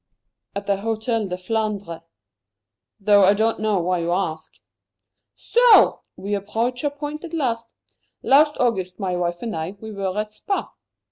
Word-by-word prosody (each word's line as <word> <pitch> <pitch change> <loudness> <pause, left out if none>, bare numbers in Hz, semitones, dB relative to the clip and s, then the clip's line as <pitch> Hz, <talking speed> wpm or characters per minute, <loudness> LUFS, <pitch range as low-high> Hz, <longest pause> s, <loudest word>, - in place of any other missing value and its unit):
"At 200 0 -4
the 200 -1 +1
Hôtel 220 0 -2
de 180 - -2
Flandre 205 -3 -3 1.0
though 205 0 +5
I 200 +2 +5
don't 220 +2 +1
know 215 -2 +1
why 180 +1 0
you 170 0 -1
ask." 165 -4 -2 0.8
"So! 485 0 +5
We 200 +2 -5
approach 225 +6 -2
a 290 - +2
point 295 +1 -6
at 340 -1 -6
last. 235 -6 -1 0.6
Last 295 +2 +4
August, 190 -7 0
my 185 -3 -1
wife 175 +1 -2
and 230 -5 -3
I, 160 +5 -4
we 220 +1 -8
were 195 -1 -3
at 210 0 -3
Spa. 395 - -3
210 Hz, 155 wpm, -22 LUFS, 185-235 Hz, 1.0 s, though